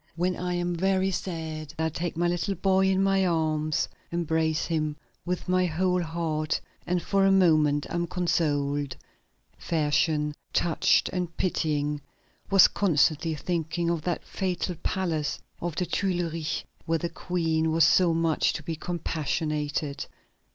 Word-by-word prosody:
When 180 +2 0
I 180 0 -2
am 175 0 -1
very 190 +2 +1
sad, 160 -4 -5
I 160 0 +1
take 165 +1 -4
my 175 +1 +2
little 175 +3 -1
boy 190 0 +3
in 190 0 +2
my 195 0 +3
arms, 155 -3 +1 0.2
embrace 160 -2 0
him 155 -3 -1 0.3
with 180 0 -3
my 185 0 +3
whole 180 +2 +1
heart, 160 -2 -1 0.3
and 180 -1 0
for 195 -1 +2
a 195 - +5
moment 155 -6 +4
am 170 0 -2
consoled." 145 -5 0 0.6
Fersen, 150 -1 +1 0.2
touched 170 -2 +3
and 180 -2 -3
pitying, 150 -4 0 0.5
was 195 -2 +8
constantly 160 -3 +2
thinking 170 +2 -1
of 170 -2 -1
that 175 +2 -2
fatal 185 -1 -2
palace 165 -6 -1 0.2
of 175 -2 -3
the 180 - 0
Tuileries 170 -5 -1 0.2
where 165 0 +2
the 170 - -2
Queen 165 -2 -1
was 165 +1 +4
so 180 -2 +5
much 165 -1 +2
to 160 - -5
be 165 +2 -3
compassionated. 150 -3 -2
165 Hz, 140 wpm, -27 LUFS, 155-180 Hz, 0.6 s, was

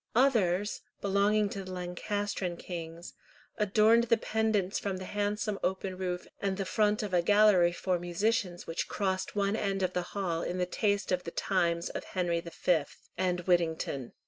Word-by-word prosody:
Others, 210 -7 +2 0.2
belonging 205 +1 +2
to 195 -1 -5
the 185 - -8
Lancastrian 185 +1 -3
kings, 170 -1 -7 0.5
adorned 215 +3 +4
the 230 0 +3
pendants 215 -3 0
from 195 -2 -3
the 185 - -6
handsome 205 +1 -1
open 190 0 -1
roof 180 -1 -3
and 195 -1 -1
the 195 - -2
front 210 +2 +1
of 205 -3 -4
a 175 - +4
gallery 205 -2 +5
for 180 +1 -1
musicians 175 +1 -1
which 165 - -3
crossed 190 -1 -1
one 200 0 +1
end 195 -3 -1
of 185 0 0
the 180 - 0 0.2
hall 170 -4 -1
in 180 - -3
the 180 - +1
taste 200 +2 0
of 180 -1 +1
the - - -5
times 170 -2 0
of - - -5
Henry 175 -2 -1
V. 170 -1 +1 0.3
and 180 -1 0
Whittington. 160 -7 0
190 Hz, 170 wpm, -30 LUFS, 175-205 Hz, 0.5 s, gallery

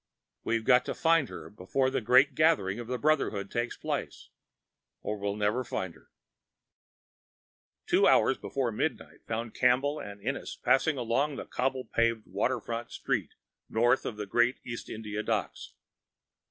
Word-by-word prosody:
We've 115 -1 -1
got 125 -1 +5
to - - -3
find 165 -5 +3
her - - -8
before 130 +7 -1
the 135 -1 -1
great 130 +5 +5
gathering 125 -10 +2
of 120 - -6
the 125 +1 -2
Brotherhood 115 -8 0
takes 120 +1 -2
place, - - -4 0.7
or 105 - -2
we'll 100 0 -2
never 105 +4 0
find 95 -7 -4
her." - - -22 1.8
Two - - +4
hours - - +4
before 130 -4 -2
midnight 105 - -3
found 115 0 -3
Campbell 135 +4 +2
and 100 0 -8
Ennis 130 +7 -4
passing 140 +2 +2
along 130 +5 0
a - - -5
cobble 130 0 -2
paved 115 -1 0
waterfront 115 +4 -2
street - - -2 0.3
north 120 +3 +3
of 105 - -5
the 105 - -4
great 120 +5 +2
East 120 -1 -6
India 105 -1 -4
Docks. 110 -4 -3
120 Hz, 150 wpm, -29 LUFS, 105-130 Hz, 1.8 s, got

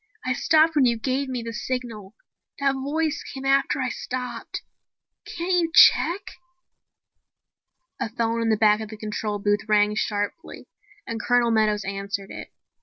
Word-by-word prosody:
"I 255 - +1
stopped 315 +4 +3
when 280 -3 +4
you 235 -1 +2
gave 265 +4 -2
me 250 -2 -3
the 230 0 -6
signal. 235 -4 -5 0.4
That 275 -1 +1
voice 290 +3 -2
came 270 0 -8
after 275 0 +2
I 255 -1 -1
stopped. 250 0 -5 0.6
Can't 350 +2 -3
you 330 -1 -1
check 360 +4 +6 1.0
?" - - -57
A - - -1
phone 230 0 -1
in 230 - 0
the 220 - +3
back 210 0 +4
of 215 - -6
the 215 - -9
control 210 0 -3
booth 205 +1 0
rang 210 0 +4
sharply 210 - -4 0.4
and 225 -1 -4
Colonel 245 -1 +2
Meadows 215 -2 +1
answered 195 0 -4
it. - - -9
235 Hz, 160 wpm, -24 LUFS, 210-270 Hz, 1.0 s, check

